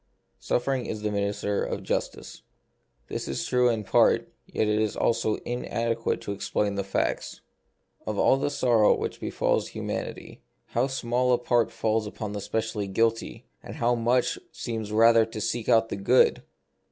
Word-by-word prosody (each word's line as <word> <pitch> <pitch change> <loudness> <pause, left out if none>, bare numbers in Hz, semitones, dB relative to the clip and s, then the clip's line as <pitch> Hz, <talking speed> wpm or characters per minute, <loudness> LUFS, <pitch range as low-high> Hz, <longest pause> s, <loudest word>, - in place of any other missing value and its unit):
Suffering 130 0 -1
is 105 -1 -5
the 105 - 0
minister 100 0 -1
of - - -4
justice. - - -4 0.7
This - - -4
is 70 - -3
true 125 0 +3
in 110 -2 -1
part, - - +3
yet 110 - -1
it 105 0 +1
also 110 -2 +1
is - - -10
in 120 +1 -3
adequate 115 0 -1
to - - -5
explain 100 +1 -1
the 100 0 -2
facts. 95 - -2 0.7
Of 105 -1 -2
all 135 - +4
the 140 - 0
sor 120 -5 +2
row 105 - +6
which - - -4
befalls - - 0
humanity, - - -6 0.3
how 120 +3 +1
small 125 -1 0
a - - +4
part 120 -1 +1
falls 110 -1 0
upon 105 0 -6
the 105 0 -4
specially 110 -1 -2
guilty; 115 +3 -1 0.2
how 120 +1 -1
much 120 +1 +1
seems 110 -3 -5
rather 115 +1 +6
to 110 0 -6
seek 115 +2 -2
out 115 0 +4
the - - -3
good 120 +6 +4
115 Hz, 165 wpm, -26 LUFS, 105-120 Hz, 0.7 s, row